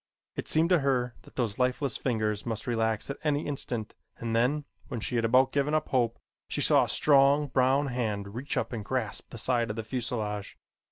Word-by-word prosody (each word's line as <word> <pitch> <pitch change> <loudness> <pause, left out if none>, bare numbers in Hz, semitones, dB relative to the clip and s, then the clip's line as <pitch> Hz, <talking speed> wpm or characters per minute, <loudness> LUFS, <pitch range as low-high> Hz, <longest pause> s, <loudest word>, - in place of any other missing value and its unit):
It - - -4
seemed 160 +2 +2
to 180 -2 +5
her 125 -3 +1
that - - -18
those 120 -3 -2
lifeless 125 0 +1
fingers 110 -4 -1
must 110 -2 -3
relax 115 0 0
at 140 - -7
any 150 -1 +1
instant 120 -6 -3 0.2
and 115 -1 -3
then, 135 +6 +2 0.2
when 120 - -4
she 120 - -2
had 115 - +1
about 130 +3 +4
given 145 +2 +1
up 155 - 0
hope, 120 -3 +1 0.3
she - - -3
saw - - +5
a - - -7
strong 140 0 +4
brown 130 +2 +3
hand 105 -6 -2
reach 130 +6 -3
up - - -1
and 110 -3 -4
grasp 115 -1 -3
the - - -9
side 120 0 +1
of 105 - -3
the 115 - -4
fuselage. 110 -3 -3
125 Hz, 205 wpm, -29 LUFS, 110-140 Hz, 0.3 s, to